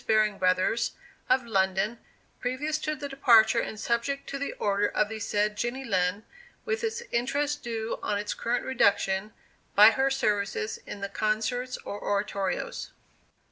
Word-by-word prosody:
Baring 215 -2 +3
Brothers, 185 +5 +2 0.4
of 255 -2 +3
London, 195 +1 +1 0.4
previous 295 +5 -2
to 305 0 -2
the 295 -1 -5
departure 235 -5 +5
and 215 - -4
subject 235 +5 -1
to 275 - -4
the 280 - -3
order 205 0 +1
of 210 0 0
the 220 0 -5
said 210 0 0
Jenny 240 +5 -2
Lind, 190 -2 0 0.4
with 455 0 -1
its 455 +1 -2
interest 285 +5 0
due 225 -2 -3
on 205 - -1
its 205 0 -2
current 240 +1 -1
reduction, 200 -4 +2 0.4
by 210 +2 +9
her 265 +4 +2
services 215 -4 -1
in 205 - -7
the 200 - -3
concerts 220 +5 -1
or 205 - -5
oratorios. 200 - -2
220 Hz, 150 wpm, -28 LUFS, 205-265 Hz, 0.4 s, by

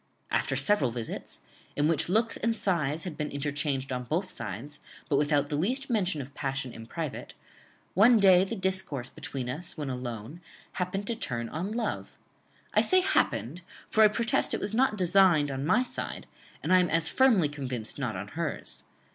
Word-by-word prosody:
"After - - +1
several 205 - +3
visits, 115 -1 -6 0.3
in 145 +1 +2
which 165 +1 +2
looks 225 +4 +2
and 230 +1 0
sighs 165 -7 0
had 180 -5 -5
been 150 - -2
interchanged 140 -1 -2
on 125 -1 -3
both 175 - -2
sides, 115 +10 -6 0.3
but 145 - +1
without 145 0 +2
the 150 - -1
least 255 - 0
mention 190 -9 0
of 135 +2 -13
passion 135 -3 -3
in 115 0 -10
private, 160 0 -5 0.6
one 225 +6 +6
day 190 -2 +7
the 195 +4 -3
discourse 185 - -1
between 130 -3 -5
us 160 +9 -4
when 145 -3 -3
alone 125 +4 -6 0.3
happened 190 +2 -3
to 235 - -2
turn 120 - -3
on 180 +6 -4
love; 225 -1 -3 0.6
I - - +5
say 370 -1 +4
happened, 145 - 0 0.3
for 220 - +4
I - - +9
protest 230 +2 0
it - - -3
was 210 - -2
not 245 -2 +2
designed 175 -5 +4
on 135 +2 -3
my 225 +8 +4
side, 255 - -5 0.4
and - - +2
I 185 - +7
am 180 - +2
as 165 0 +2
firmly 230 - +4
convinced 130 -5 -5
not 125 -7 -2
on 100 +3 -6
hers. 165 +1 -4
155 Hz, 180 wpm, -28 LUFS, 135-195 Hz, 0.6 s, I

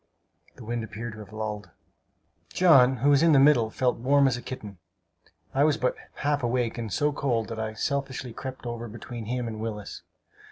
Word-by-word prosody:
The - - -12
wind 120 0 -2
appeared 110 +1 -6
to 110 - -11
have 105 -2 -11
lulled. 105 -2 -5 0.8
John, 135 -8 +5
who 140 +5 +3
was 140 0 +5
in 165 -1 +5
the 140 - +6
middle, 135 -5 +5
felt 125 +2 0
warm 140 +3 +4
as 130 - +1
a 120 - -6
kitten. 105 -7 -8 0.7
I 135 - +3
was 150 -1 +3
but 125 - 0 0.2
half 145 0 0
awake, 120 -1 -1
and 115 -3 -4
so 150 +9 +1
cold 120 -6 -1
that 115 -1 -5
I 110 0 -3
selfishly 130 -3 -3
crept 130 0 -7
over 120 0 -4
between 115 +1 -8
him 125 +1 -2
and 110 -1 -5
Willis. 105 -2 -5
120 Hz, 195 wpm, -27 LUFS, 110-135 Hz, 0.8 s, the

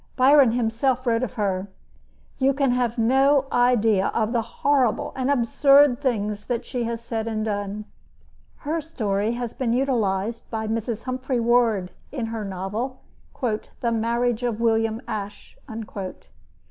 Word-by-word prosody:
Byron 265 -2 +6
himself 245 +2 0
wrote 230 -1 +2
of 255 -1 -3
her: 200 -4 -1 0.7
You 270 0 +3
can 275 -2 +2
have 245 -1 0
no 270 +4 +4
idea 225 -5 +3
of 225 +1 0
the 235 - +2
horrible 245 +1 0
and 260 0 -1
absurd 275 +1 +4
things 210 -6 -1
that 240 -2 -2
she 245 -2 -3
has 230 0 -3
said 225 -1 -4
and 215 -1 -2
done. 205 0 -3 0.8
Her 320 +3 -1
story 215 -8 -1
has 240 -1 -4
been 240 -3 -1
utilized 230 -4 -1
by 220 -1 -3
Mrs. 225 0 -3
Humphry 255 0 -2
Ward 230 -5 +2 0.2
in 255 -5 -3
her 225 -2 -3
novel, 205 +7 -4 0.4
"The 235 +1 -2
Marriage 235 +1 0
of 235 -3 -2
William 225 0 +1
Ashe." 205 -1 -6
235 Hz, 140 wpm, -24 LUFS, 220-255 Hz, 0.8 s, Byron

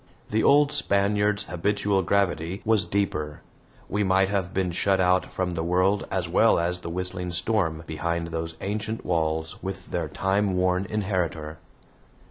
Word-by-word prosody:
The 110 +1 +2
old 145 0 +5
Spaniard's 105 0 +1
habitual 100 +2 0
gravity 95 -1 0
was 110 -5 +2
deeper; 80 -6 -2 0.5
we 105 +1 0
might 95 0 +3
have 95 -3 -1
been 95 -2 0
shut 95 +2 +1
out 90 0 +3
from 95 -1 -2
the 85 -2 -3
world 90 +4 +1
as 90 -3 -1
well 110 +7 +4
as 85 +1 -1
the 85 - -7
whistling 90 +1 -1
storm, 85 -3 0
behind 85 +2 -2
those 80 0 -4
ancient 105 +3 -3
walls 80 -2 -1
with 95 0 -6
their 85 -3 -1
time 95 +5 0
worn 90 +1 +1
inheritor. 90 -7 -2
95 Hz, 150 wpm, -25 LUFS, 85-100 Hz, 0.5 s, old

